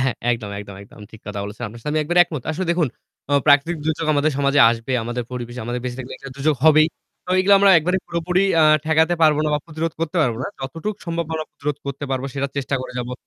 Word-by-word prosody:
হ্যাঁ 130 -2 +1 0.2
একদম, 110 -3 -5
একদম 100 -1 -10
একদম 105 - -16
ঠিক 110 - -14
কথা 105 -1 -5
বলেছেন। 105 +4 -8
আপনার 115 +3 -10
সাথে 150 - -4
আমি 155 - +1
একবারে 175 +4 0
একমত। 160 -7 -5
আসলে 175 +3 -3
দেখু, 170 0 +1 0.5
আ - - 0
প্রাকৃতিক 145 +4 +4
দুর্যোগ 160 0 -1
আমাদের 150 +2 +2
সমাজে 140 +1 +3
আসবে, 115 +3 -4
আমাদের 120 +1 -3
পরিবেশে 120 0 -6
আমাদের 120 +1 -3
বেঁচে 125 0 -4
থাকলে 130 0 -7
একটা 135 - -10
দূর্যোগ 150 +2 +1
হবেই। 155 0 +6 0.4
তো 180 - -6
এগুলো 200 +2 +5
আমরা 200 -1 +6
একবারে 180 +4 0
পুরোপুরি 175 +2 0 0.2
আ - - +6 0.2
ঠেকাতে 160 +2 +3
পারবো 150 -2 +5
না - - +1
বা - - +1
প্রতিরোধ 165 0 -3
করতে 165 +2 -2
পারব 120 -6 +1
না। - - -2
যতটুক 165 +10 -4
সম্ভব 170 0 -2
আমরা 155 0 -3
প্রতিরোধ 145 0 -4
করতে 140 +1 -4
পারব 130 -1 -1
সেটা 140 0 -1
চেষ্টা 140 0 -1
করে 130 - -7
যাবো। 125 +1 -4
145 Hz, 235 wpm, -21 LUFS, 125-165 Hz, 0.5 s, হবেই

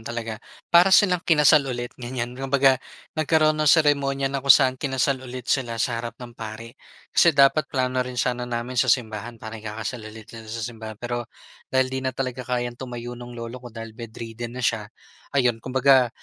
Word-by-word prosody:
talaga, 115 -1 -5 0.3
para 175 +2 +7
silang 190 -2 +5
kinasal 150 -3 +5
ulit, 120 -1 -4
ganyan. 120 0 -4
Kumbaga 135 0 +2 0.3
nagkaroon 155 0 +3
nung 155 -1 +1
seremonya 140 -4 +3
na 140 - -1
kung 140 - -8
saan 130 -2 +2
kinasal 135 -1 0
ulit 125 -1 -8
sila 120 -3 0
sa 115 0 -1
harap 115 0 -7
ng 120 -1 -10
pari. 115 0 -8 0.4
Kasi 165 -4 +4
dapat 140 +2 +4
plano 130 -1 0
rin 125 0 -4
sana 125 0 -1
namin 120 +1 -1
sa 130 - +1
simbahan 115 -1 0
para 110 0 -8
ikakasal 110 +3 -5
ulit 110 0 -12
sila 115 -1 -10
sa 115 0 -5
simbahan 110 -2 -7
pero, 120 +1 -4 0.4
dahil 130 0 +2
'di 130 - -2
na 130 0 -2
talaga 130 -1 -4
kayang 120 -1 -2
tumayo 120 -1 -6
nung 120 0 -9
lolo 115 +2 -7
ko 120 - -9
dahil 115 -1 -9
bedridden 115 +1 -8
na 130 - -3
siya, 110 -3 0 0.5
ayon 120 -4 +2
kumbaga, 130 0 +4
125 Hz, 185 wpm, -24 LUFS, 115-135 Hz, 0.5 s, para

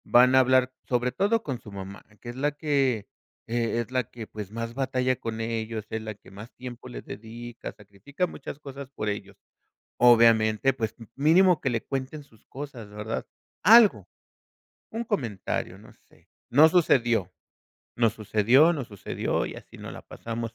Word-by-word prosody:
Van 125 +1 +6
a - - +8
hablar 130 0 +4 0.2
sobre 125 0 +1
todo 210 - +1
con 130 -5 -4
su 105 - -12
mamá, 100 0 -8 0.2
que 120 - -8
es 120 - -7
la 145 +3 0
que, 135 -8 0 0.4
eh, 115 -1 -1
es 120 - -8
la 130 -1 +1
que, 115 -2 -8
pues, 105 -2 -8
más 115 +1 -4
batalla 130 -1 0
con 115 0 -4
ellos, 115 -1 -3
es 110 - -2
la 110 -1 -6
que 100 - -18
más 105 +5 -10
tiempo 125 0 -9
le 125 - -7
dedica, 115 +2 -8
sacrifica 105 - -5
muchas 140 -5 -8
cosas 140 -2 -9
por 105 -6 -3
ellos. 100 -1 -5 0.6
Obviamente, 115 0 +5
pues, 110 -4 -3
m 115 -3 -12
mínimo 170 +5 +5
que 135 - 0
le 115 -2 -1
cuenten 135 +2 -4
sus 115 -6 -24
cosas, 130 -6 -8
¿verdad? 105 +2 -4 0.4
Algo, 225 0 +7 0.8
un 230 +2 -3
comentario, 125 - -3
no - - -16 0.2
sé. - - -26 0.2
No 150 +5 +7
sucedió, 120 - +3 0.6
no 115 -1 +3
sucedió, 115 - +4
no 145 -6 -3
sucedió, 100 -4 -2
y - - -6
así - - -13
nos - - -8
la - - -10
pasamos 115 0 -6
120 Hz, 170 wpm, -26 LUFS, 110-135 Hz, 0.8 s, a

